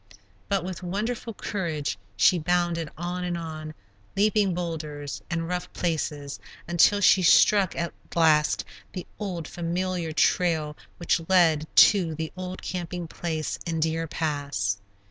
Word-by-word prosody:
But 195 -3 +1
with 185 0 -5
wonderful 215 +5 -3
courage 155 - -3 0.2
she 175 - +5
bounded 170 -1 0
on 175 +2 -3
and 175 -1 -2
on, 155 -2 -6 0.4
leaping 205 -2 +3
boulders 155 -5 -4
and 165 -1 -2
rough 180 0 -3
places, 150 -4 -2 0.3
until 175 +4 +4
she 190 -1 +6
struck 195 +2 +5
at 170 0 -2 0.2
last 155 -2 +3 0.3
the 180 - -5
old, 180 -6 -4
familiar 175 0 -2
trail 155 -1 +1 0.2
which 170 0 +1
led 165 -5 +4 0.3
to 175 -6 -1
the 160 0 -4
old 185 0 -6
camping 175 -1 -4
place 160 -1 -3
in 165 -1 -1
Deer 165 +1 0
Pass. 140 -12 -2
170 Hz, 130 wpm, -26 LUFS, 155-180 Hz, 0.4 s, she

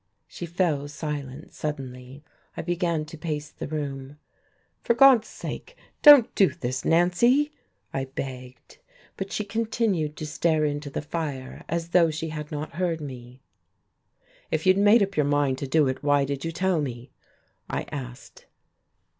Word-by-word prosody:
She 175 - -7
fell 165 -5 0
silent 145 -1 -6
suddenly. 135 -2 -6 0.3
I - - -3
began 170 -2 -1
to 155 +1 -11
pace 150 -3 -4
the - - -7
room. 140 -2 -5 0.6
"For 235 - +1
God's 250 -3 +7
sake, - - -8 0.2
don't 290 -6 +9
do 195 - +5
this, 130 -3 -4
Nancy!" 235 - +3 0.4
I 135 -1 -1
begged. 130 - -8 0.4
But 195 0 -5
she 210 - -1
continued 200 -8 -1
to 155 - -5
stare 155 0 +1
into 145 0 -3
the 140 - -4
fire, 145 -5 -5
as 165 0 -2
though 170 -2 +5
she 160 +1 -4
had 150 0 -6
not 150 0 -5
heard 175 -3 0
me. 130 -3 -9 1.1
"If - - -1
you 185 - +7
had 195 - 0
made 205 +2 +6
up 200 0 -3
your 150 -2 +2
mind 145 -2 +1
to 140 - -4
do 150 +1 +3
it, 130 - -2
why 145 -1 +3
did 140 0 -4
you 165 - -2
tell 180 0 +1
me?" 125 -3 -6 0.6
I - - -2
asked. 125 -4 -8
150 Hz, 160 wpm, -26 LUFS, 140-175 Hz, 1.1 s, don't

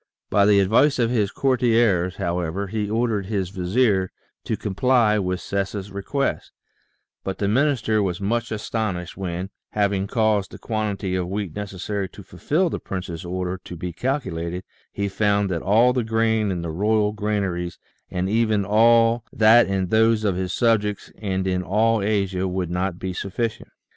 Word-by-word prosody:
By 100 -1 +4
the 105 -1 +5
advice 115 +10 +4
of 120 -1 +1
his 105 -5 +1
courtiers, 115 -8 +2
however, 90 +1 -2
he 105 +1 -3
ordered 110 -3 0
his 95 -4 -2
vizier 95 +1 +1 0.4
to - - -1
comply 110 +1 +2
with 90 -2 -1
Sessa's 100 0 -3
request, 120 +8 -2 0.7
but 95 - -4
the 100 - -1
minister 110 -2 +2
was 90 -3 -1
much 115 +4 -1
astonished 105 -5 -3
when, 95 0 -4 0.2
having 100 -2 +1
caused 110 -3 +1
the - - -10
quantity 105 -4 -2
of 90 -1 -1
wheat 95 -3 -4
necessary 100 -1 -4
to 100 - -12
fulfil 155 - -1
the - - -3
prince's 90 -4 -5
order 90 +1 -3
to 90 - -8
be 90 +1 -5
calculated, 90 - -3 0.3
he 100 - -2
found 100 0 +1
that 85 -2 -1
all 115 +5 +4
the 125 -2 0
grain 110 -1 +1
in 90 -3 -2
the 85 - -3
royal 105 +4 +1
granaries, 100 -5 -2 0.3
and 90 +1 -2
even 110 -1 +1
all 115 +2 +4
that 110 +2 +6
in 95 -2 -1
those 110 +1 +3
of 100 -4 +1
his 90 0 -2
subjects 105 -3 +1
and 95 -3 -2
in 90 -1 0
all 110 +4 +2
Asia, 100 -2 0
would 90 -2 -2
not 90 0 -1
be 95 0 -4
sufficient. 110 +5 -3
100 Hz, 165 wpm, -23 LUFS, 95-110 Hz, 0.7 s, that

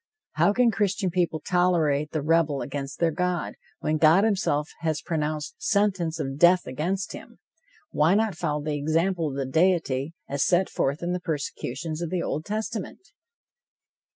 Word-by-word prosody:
How - - +3
can 240 +2 +3
Christian 195 -2 0
people 170 -3 0
tolerate 165 -5 +2
the 155 -2 -3
rebel 155 -3 +2
against 140 -1 -5
their 170 -1 +2
God, 180 +2 -1 0.3
when 155 0 0
God 160 +5 +5
himself 185 -8 0
has 160 -2 -1
pronounced 155 -2 -3
sentence 190 -6 +1
of 135 -1 -4
death 175 +2 +5
against 175 +9 -2
him? - - -11 0.5
Why 160 +5 +3
not 220 -1 +1
follow 150 -3 -2
the 155 0 -2
example 165 +4 0
of 135 - -6
the 135 -1 -2
deity, 160 -1 +1
as 140 0 0
set 185 +1 +2
forth 140 +5 -1
in 175 +1 -1
the 180 - -1
persecutions 155 -1 -4
of 170 - -2
the 180 0 -1
Old 155 - -3
Testament? 215 - -5
165 Hz, 160 wpm, -26 LUFS, 150-185 Hz, 0.5 s, God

